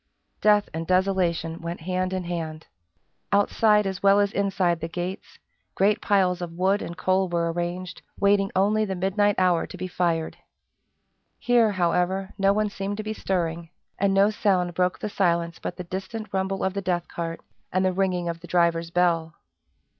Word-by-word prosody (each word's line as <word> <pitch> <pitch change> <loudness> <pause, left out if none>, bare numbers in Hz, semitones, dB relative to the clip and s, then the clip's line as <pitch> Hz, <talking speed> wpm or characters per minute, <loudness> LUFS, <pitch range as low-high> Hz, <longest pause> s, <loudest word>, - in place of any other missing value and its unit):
Death 210 -1 +4
and 165 0 -4
Desolation 180 -3 +1
went 170 +1 -5
hand 185 +2 -1
in 185 -1 -2
hand. 165 -2 -5 0.7
Outside 210 +1 +3
as 190 0 -3
well 200 0 +5
as 200 -1 +2
inside 190 -4 0
the 165 - -4
gates, 180 +3 -6 0.4
great 205 +2 +2
piles 185 -3 +2
of 170 -1 -5
wood 190 +4 +1
and 170 - -6
coal 190 0 +1
were 170 -1 0
arranged, 175 +1 -4 0.2
waiting 200 0 +3
only 210 +3 +3
the 195 -2 -2
midnight 200 +3 +1
hour 180 -2 +2
to - - -10
be 185 +1 -4
fired. 170 -3 -1 1.0
Here, 235 -3 +3
however, 185 +2 0
no 195 0 +4
one 210 +1 +1
seemed 200 +1 -4
to 215 - -4
be 215 0 -3
stirring; 170 -5 -2 0.3
and 200 0 +2
no 195 +2 +4
sound 185 -5 +1
broke 180 +1 +1
the - - -4
silence 170 -4 0
but 175 - -5
the 180 - -5
distant 195 +4 -6
rumble 190 0 -1
of 190 - 0
the 200 - -3
death 175 -2 -1
cart, 165 -1 -5 0.3
and 185 +1 +1
the 185 - +2
ringing 180 -2 0
of 170 0 -3
the 175 - -12
driver's 170 -1 +1
bell. 170 -2 +1
185 Hz, 175 wpm, -25 LUFS, 170-195 Hz, 1.0 s, well